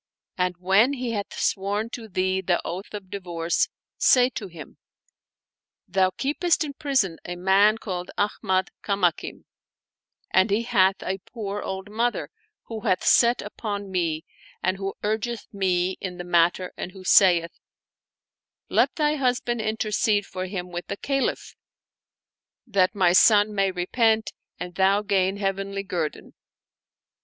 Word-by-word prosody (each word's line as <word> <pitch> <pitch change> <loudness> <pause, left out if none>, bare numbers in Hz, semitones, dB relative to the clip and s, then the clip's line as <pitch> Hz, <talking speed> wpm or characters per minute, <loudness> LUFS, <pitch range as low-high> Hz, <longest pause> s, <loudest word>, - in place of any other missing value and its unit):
And 180 -1 0
when 195 +9 +3
he 250 -3 -3
hath 205 -3 -3
sworn 205 +4 -1
to 230 -3 -7
thee 190 -1 0
the 175 -1 +1
oath 185 +4 -5
of 200 -3 -8
divorce, 175 -3 -1 0.3
say 250 0 +5
to 215 -4 -6
him: 165 -4 -12 1.1
Thou 190 -1 +2
keepest 325 +4 +1
in 290 -2 -5
prison 265 - 0
a 175 - -5
man 195 +4 +4
called 180 -5 -5
Ahmad 190 -2 0
Kamakim, 195 -5 -1 0.9
and 190 +3 +4
he 210 +3 +1
hath 190 -4 +2
a 190 +1 -3
poor 205 0 -6
old 190 +1 -5
mother 235 +3 -1 0.3
who 225 -1 -6
hath 200 -5 0
set 235 0 +4
upon 205 -1 -5
me 165 -3 -1 0.4
and 185 +1 +1
who 195 0 -4
urgeth 220 +2 -2
me 185 -2 0
in 180 -2 -5
the 175 - -5
matter 175 +1 +2
and 180 - -6
who 190 -1 -11
saith, 175 -3 +5 1.2
*Let - - +2
thy 300 -2 +1
husband 245 -3 0
intercede 215 -1 0
for 185 -1 -5
him 180 -2 -5
with 175 0 -5
the 200 - -4
Caliph, 275 +2 -2 1.1
that 200 -4 +2
my 180 -3 +4
son 210 +2 +5
may 195 -1 +2
repent 220 +5 +1 0.3
and 180 0 -6
thou 195 +3 +3
gain 195 -1 +1
heavenly 195 0 -2
guerdon.' 175 -6 -4
195 Hz, 140 wpm, -25 LUFS, 185-220 Hz, 1.2 s, say